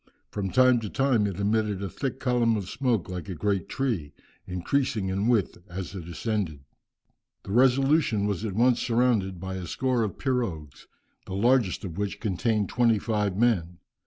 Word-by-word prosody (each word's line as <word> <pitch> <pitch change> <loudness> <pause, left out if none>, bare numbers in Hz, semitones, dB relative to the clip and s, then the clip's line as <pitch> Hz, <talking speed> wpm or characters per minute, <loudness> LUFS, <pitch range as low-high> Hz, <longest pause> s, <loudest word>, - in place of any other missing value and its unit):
From 100 -2 -3
time 130 +2 +5
to 110 -3 -5
time 130 -5 +2
it 100 -1 -5
emitted 105 -1 0
a - - -2
thick 130 +7 -4
column 120 -3 +2
of 100 -4 -5
smoke 120 -8 0
like 90 +1 -6
a 95 - -4
great 100 +2 -1
tree, 110 - -2 0.3
increasing 100 +3 -1
in 100 +3 0
width 115 -8 +1
as 90 0 -6
it 90 -4 -7
ascended." 90 -5 -2 0.8
The - - -8
Resolution 130 -2 +3
was 105 -1 -2
at 105 -4 -3
once 120 +3 +3
surrounded 115 -6 +1
by 95 +1 -5
a 90 -2 -6
score 130 +5 0
of 110 -3 -2
pirogues, 105 - -3 0.4
the 95 - -5
largest 115 -2 +2
of 90 +1 -6
which 100 0 -2
contained 105 0 0
twenty 115 -2 +3
five 105 -3 -1
men. 95 -7 +1
105 Hz, 170 wpm, -27 LUFS, 95-120 Hz, 0.8 s, time